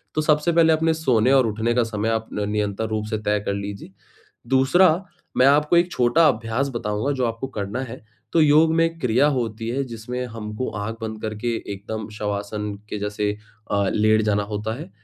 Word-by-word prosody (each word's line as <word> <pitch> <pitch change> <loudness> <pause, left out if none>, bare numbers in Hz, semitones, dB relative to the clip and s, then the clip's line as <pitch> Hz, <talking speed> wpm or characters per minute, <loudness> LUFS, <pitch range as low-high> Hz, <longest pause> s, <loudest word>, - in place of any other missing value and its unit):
तो 155 - +2
सबसे 150 +2 +2
पहले 165 -1 +5
अपने 160 +1 +2
सोने 130 -7 +2
और 135 -3 +5
उठने 110 +2 0
का 125 - +3
समय 110 -1 -2
आप 110 0 -1
न 105 0 -2
निरंतर 105 +1 -1
रूप 110 -1 -2
से 110 - -1
तय 105 0 0
कर 100 - 0
लीजिए। 100 -1 -6 0.6
दूसरा 135 +7 +4 0.4
मैं 130 - +5
आपको 150 +4 +4
1 175 +1 +3
छोटा 125 +7 +4
अभ्यास 115 +5 -1
बताऊँगा 110 +4 -1
जो 130 -3 0
आपको 115 +3 -3
करना 100 +5 -3
है। 130 -2 -10 0.3
तो 165 - +4
योग 155 +1 +5
में 165 - +4
एक 165 0 -3
क्रिया 125 +1 +3
होती 115 -2 -3
है, 130 +4 -1
जिसमें 125 +1 -5
हमको 110 +1 -5
आँख 110 +2 -4
बंद 110 -1 -5
करके 110 +2 -2 0.2
एकदम 105 +2 -6
शवासन 105 0 -3 0.2
के 105 - -4
जैसे 105 0 -1 0.4
अ, 100 -1 +1
लेट 110 +1 +3
जाना 105 -1 +1
होता 105 +1 -3
है, - - -9
115 Hz, 195 wpm, -23 LUFS, 105-135 Hz, 0.6 s, पहले